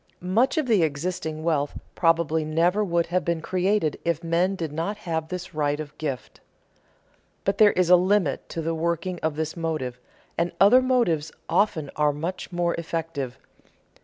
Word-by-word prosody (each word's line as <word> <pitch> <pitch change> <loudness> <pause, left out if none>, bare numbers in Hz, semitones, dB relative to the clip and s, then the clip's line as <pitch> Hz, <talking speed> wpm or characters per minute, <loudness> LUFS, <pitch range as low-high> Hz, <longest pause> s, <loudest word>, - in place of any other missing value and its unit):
Much 255 - +3
of 310 - +2
the 220 -7 +3
existing 160 +1 -2
wealth 150 -3 0 0.2
probably 165 -2 +2
never 170 +6 +2
would 170 -3 +1
have 180 +2 0
been 170 -1 0
created 185 -1 0
if 170 0 -1
men 170 +3 +1
did 165 -5 -4
not 170 +7 -2
have 165 -6 -3
this 180 +1 -6
right 145 -1 0
of 150 -2 -7
gift. 135 -8 -5 1.0
But 195 0 0
there 210 -1 +7
is 180 -1 +2
a - - +10
limit 180 -4 +1
to 165 - -4
the 165 +1 -1
working 170 +2 -2
of 160 -2 -1
this 155 0 -3
motive, 155 -7 -3 0.4
and 170 +1 0
other 230 +6 +7
motives 230 - +1 0.2
often 170 -6 +1
are 150 0 +2
much 165 +7 -5
more 175 -1 0
effective. 160 -6 -4
165 Hz, 165 wpm, -25 LUFS, 155-185 Hz, 1.0 s, a